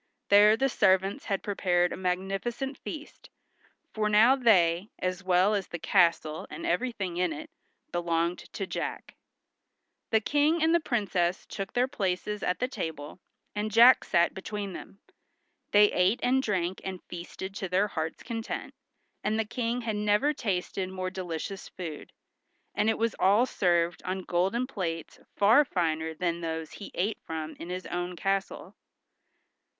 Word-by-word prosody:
There 210 Hz, +2 st, +7 dB
the 270 Hz, -, +2 dB
servants 190 Hz, -5 st, +2 dB
had 195 Hz, -1 st, -2 dB
prepared 180 Hz, -3 st, +1 dB
a -, -, -3 dB
magnificent 195 Hz, +9 st, -2 dB
feast, 305 Hz, -1 st, -9 dB, 0.6 s
for 215 Hz, -1 st, 0 dB
now 220 Hz, +5 st, +6 dB
they, 190 Hz, -7 st, +3 dB
as 185 Hz, +1 st, -3 dB
well 185 Hz, +3 st, +3 dB
as 200 Hz, -2 st, -1 dB
the 175 Hz, -, -5 dB
castle 165 Hz, -2 st, +2 dB
and 335 Hz, -, -7 dB
everything 230 Hz, -, -1 dB
in 180 Hz, -1 st, +1 dB
it, 150 Hz, -, -7 dB, 0.4 s
belonged 170 Hz, 0 st, 0 dB
to 195 Hz, -, -3 dB
Jack. -, -, -5 dB, 0.9 s
The 220 Hz, -, +4 dB
King 295 Hz, +7 st, +2 dB
and 325 Hz, +1 st, +4 dB
the 340 Hz, -, +5 dB
Princess 195 Hz, -, 0 dB
took 195 Hz, -1 st, -6 dB
their 245 Hz, +1 st, +2 dB
places 210 Hz, -4 st, -2 dB
at 180 Hz, -, 0 dB
the 250 Hz, -, -1 dB
table, 160 Hz, -, -6 dB, 0.3 s
and 210 Hz, +1 st, -2 dB
Jack 235 Hz, +3 st, +7 dB
sat 170 Hz, 0 st, +2 dB
between 200 Hz, 0 st, -5 dB
them. 195 Hz, -, -10 dB, 0.7 s
They 205 Hz, 0 st, +6 dB
ate 190 Hz, +6 st, +2 dB
and 260 Hz, +2 st, +3 dB
drank 190 Hz, -6 st, -1 dB
and 190 Hz, -1 st, -6 dB
feasted 180 Hz, +2 st, -7 dB
to 190 Hz, -, -4 dB
their 190 Hz, +3 st, +2 dB
hearts' 160 Hz, -3 st, -4 dB
content, 225 Hz, -1 st, -5 dB, 0.5 s
and 215 Hz, +1 st, 0 dB
the 225 Hz, -, 0 dB
King 235 Hz, +2 st, -2 dB
had 225 Hz, -2 st, -2 dB
never 210 Hz, +8 st, +2 dB
tasted 190 Hz, -6 st, -2 dB
more 185 Hz, 0 st, -4 dB
delicious 185 Hz, +1 st, -5 dB
food, 165 Hz, -5 st, -7 dB, 0.6 s
and 210 Hz, +2 st, +2 dB
it 220 Hz, -, +1 dB
was 230 Hz, -1 st, 0 dB
all 205 Hz, +6 st, +5 dB
served 175 Hz, -6 st, +1 dB
on 185 Hz, 0 st, -3 dB
golden 190 Hz, +9 st, 0 dB
plates 170 Hz, -, -5 dB, 0.2 s
far 220 Hz, +9 st, +6 dB
finer 160 Hz, -, -1 dB
than 170 Hz, 0 st, -1 dB
those 160 Hz, -1 st, -4 dB
he 205 Hz, -, -9 dB
ate 205 Hz, +5 st, -1 dB
from 160 Hz, -1 st, -5 dB
in 170 Hz, -, -7 dB
his 185 Hz, 0 st, -4 dB
own 175 Hz, 0 st, -3 dB
castle. 195 Hz, +2 st, -2 dB
195 Hz, 155 wpm, -28 LUFS, 175-220 Hz, 0.9 s, There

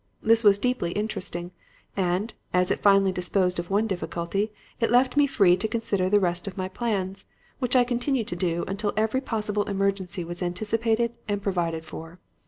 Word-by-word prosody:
This 225 Hz, +1 st, +5 dB
was 205 Hz, -2 st, +6 dB
deeply 210 Hz, -6 st, -1 dB
interesting; 185 Hz, -4 st, -3 dB, 0.4 s
and, 190 Hz, +3 st, 0 dB, 0.2 s
as 180 Hz, 0 st, +3 dB
it -, -, 0 dB
finally 195 Hz, -1 st, +4 dB
disposed 180 Hz, 0 st, 0 dB
of 175 Hz, -, -5 dB
one 205 Hz, +3 st, +2 dB
difficulty, 195 Hz, +1 st, -2 dB, 0.3 s
it 230 Hz, -, +1 dB
left 250 Hz, +3 st, +3 dB
me 290 Hz, 0 st, +5 dB
free 195 Hz, -10 st, +4 dB
to 190 Hz, +4 st, -2 dB
consider 210 Hz, -5 st, 0 dB
the 205 Hz, +1 st, +5 dB
rest 175 Hz, -1 st, 0 dB
of 195 Hz, -, -6 dB
my 185 Hz, -1 st, -2 dB
plans, 195 Hz, -2 st, -1 dB, 0.3 s
which 250 Hz, -1 st, 0 dB
I 250 Hz, -, +6 dB
continued 245 Hz, -1 st, -1 dB
to -, -, -3 dB
do 175 Hz, -1 st, -1 dB
until 205 Hz, +2 st, -2 dB
every 220 Hz, +4 st, +1 dB
possible 210 Hz, -4 st, -1 dB
emergency 195 Hz, -2 st, -1 dB
was 175 Hz, +2 st, -7 dB
anticipated 225 Hz, +6 st, 0 dB
and 205 Hz, -1 st, -1 dB
provided 170 Hz, -5 st, -2 dB
for. 165 Hz, +2 st, -9 dB
200 Hz, 180 wpm, -26 LUFS, 180-225 Hz, 0.4 s, was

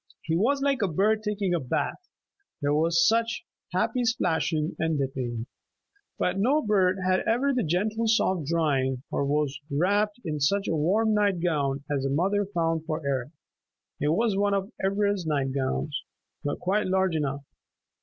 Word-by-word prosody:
He 160 Hz, -, -1 dB
was 275 Hz, +10 st, +2 dB
like 275 Hz, -4 st, +1 dB
a 200 Hz, -, +2 dB
bird 210 Hz, +6 st, +2 dB
taking 205 Hz, -3 st, -1 dB
a 175 Hz, -, +1 dB
bath; 145 Hz, -, -3 dB, 0.5 s
there 145 Hz, -1 st, +1 dB
was 165 Hz, +2 st, +3 dB
such 230 Hz, +1 st, +1 dB, 0.3 s
happy 250 Hz, -2 st, 0 dB
splashing 165 Hz, -8 st, 0 dB
and 160 Hz, -1 st, +1 dB
dipping. 125 Hz, -4 st, -3 dB, 0.7 s
But 195 Hz, -, 0 dB
no 280 Hz, +9 st, +3 dB
bird 190 Hz, -3 st, +2 dB
had 185 Hz, 0 st, +3 dB
ever 265 Hz, +5 st, +2 dB
the 255 Hz, -, +1 dB
gentle 210 Hz, +7 st, 0 dB
soft 190 Hz, -, +2 dB
drying, 135 Hz, -6 st, 0 dB
or -, -, 0 dB
was 145 Hz, 0 st, 0 dB
wrapped 205 Hz, +9 st, +1 dB
in 150 Hz, -2 st, -2 dB
such 195 Hz, +8 st, +1 dB
a -, -, 0 dB
warm 205 Hz, +9 st, +2 dB
night 205 Hz, -3 st, +2 dB
gown 145 Hz, -5 st, 0 dB
as 135 Hz, -, -1 dB
the 135 Hz, -, -1 dB
mother 195 Hz, +8 st, +1 dB
found 165 Hz, -4 st, -1 dB
for 155 Hz, -2 st, -3 dB
Eric. 135 Hz, -2 st, -1 dB, 0.7 s
It 145 Hz, -, 0 dB
was 220 Hz, +2 st, +1 dB
one 200 Hz, 0 st, +2 dB
of 195 Hz, +3 st, -2 dB
Ivra's 200 Hz, -2 st, +1 dB
night 140 Hz, -3 st, 0 dB
gowns, 140 Hz, +2 st, -2 dB, 0.4 s
but 145 Hz, -, -2 dB
quite 200 Hz, +3 st, 0 dB
large 190 Hz, -2 st, +1 dB
enough. 140 Hz, -2 st, -2 dB
175 Hz, 165 wpm, -27 LUFS, 150-210 Hz, 0.7 s, was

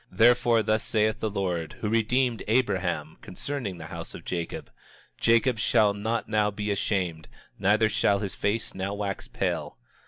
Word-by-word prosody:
27:33 90 Hz, -, -17 dB
Therefore, 120 Hz, 0 st, +5 dB
thus 110 Hz, +1 st, +1 dB
saith 110 Hz, 0 st, +1 dB
the 110 Hz, -, -1 dB
Lord, 90 Hz, -5 st, -2 dB
who 110 Hz, -, -4 dB
redeemed 115 Hz, +2 st, +1 dB
Abraham, 95 Hz, -9 st, 0 dB
concerning 110 Hz, -2 st, -4 dB
the 80 Hz, -, -8 dB
house -, -, -7 dB
of -, -, -10 dB
Jacob: 85 Hz, -2 st, -4 dB, 0.5 s
Jacob 115 Hz, +1 st, +3 dB
shall 105 Hz, -2 st, +3 dB
not 110 Hz, +3 st, -2 dB
now 105 Hz, -1 st, +2 dB
be 105 Hz, 0 st, -3 dB
ashamed, 90 Hz, -5 st, -1 dB, 0.3 s
neither 105 Hz, +3 st, +4 dB
shall 100 Hz, -2 st, +2 dB
his 100 Hz, -1 st, -4 dB
face 105 Hz, +2 st, -1 dB
now 95 Hz, +1 st, -3 dB
wax 100 Hz, -1 st, -4 dB
pale. -, -, -2 dB
105 Hz, 160 wpm, -27 LUFS, 95-115 Hz, 0.5 s, Therefore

